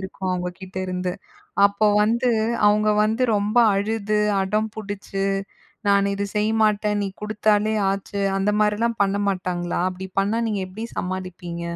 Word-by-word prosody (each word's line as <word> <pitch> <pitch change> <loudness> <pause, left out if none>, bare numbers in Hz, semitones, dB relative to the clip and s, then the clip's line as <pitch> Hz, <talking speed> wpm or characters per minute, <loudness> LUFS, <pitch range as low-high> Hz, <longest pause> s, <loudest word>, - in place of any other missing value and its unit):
இருக்கும் 190 0 -4
அவங்க 180 0 -2
கிட்டருந்து. 185 -1 -3 0.5
அப்போ 200 +1 0 0.2
வந்து 235 +3 +2 0.4
அவங்க 210 +1 +3 0.2
வந்து 220 +4 0
ரொம்ப 205 +3 -1 0.2
அழுது, 210 +1 0 0.2
அடம் 215 +3 0
பிடிச்சு 200 -2 -4 0.6
"நான் 200 0 +3
இது 200 0 -2
செய்யமாட்டேன்! 210 -1 +2
நீ 200 - -1
குடுத்தாலே 215 0 +1 0.2
ஆச்சு." 200 +1 -3
அந்த 195 +2 +1
மாரிலாம் 220 +2 +1
பண்ண 195 0 +1
மாட்டாங்களா? 180 -2 -2
அப்படி 190 +1 -7
பண்ணா 210 +4 0
நீங்க 205 -2 -1
எப்படி 215 +5 -7
சமாளிப்பீங்க? 180 -2 -5
200 Hz, 135 wpm, -23 LUFS, 190-215 Hz, 0.6 s, அவங்க